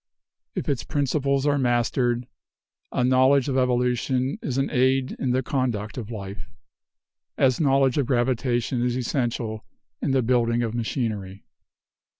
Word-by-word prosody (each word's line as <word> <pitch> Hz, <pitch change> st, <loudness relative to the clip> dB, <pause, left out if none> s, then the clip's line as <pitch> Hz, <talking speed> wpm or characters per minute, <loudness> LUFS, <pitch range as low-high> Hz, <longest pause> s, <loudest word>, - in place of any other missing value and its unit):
If -, -, -3 dB
its 135 Hz, -5 st, -1 dB
principles 140 Hz, -1 st, 0 dB
are 145 Hz, -1 st, +2 dB
mastered, 120 Hz, 0 st, +1 dB, 0.7 s
a -, -, 0 dB
knowledge 130 Hz, +2 st, +4 dB
of 135 Hz, -, -1 dB
evolution 125 Hz, +1 st, +1 dB
is 130 Hz, -2 st, -3 dB
an 135 Hz, -, 0 dB
aid 130 Hz, 0 st, +2 dB
in 135 Hz, -, -1 dB
the 130 Hz, +1 st, +1 dB
conduct 120 Hz, -6 st, -2 dB
of 115 Hz, -4 st, -6 dB
life, 100 Hz, -3 st, -7 dB, 0.9 s
as 130 Hz, -2 st, +3 dB
knowledge 135 Hz, -2 st, +3 dB
of 135 Hz, -, 0 dB
gravitation 120 Hz, -1 st, 0 dB
is 125 Hz, 0 st, 0 dB
essential 120 Hz, -3 st, -2 dB, 0.4 s
in -, -, -1 dB
the 135 Hz, -1 st, +2 dB
building 120 Hz, 0 st, +2 dB
of 115 Hz, -1 st, -2 dB
machinery. 110 Hz, -5 st, -3 dB
125 Hz, 140 wpm, -24 LUFS, 120-135 Hz, 0.9 s, knowledge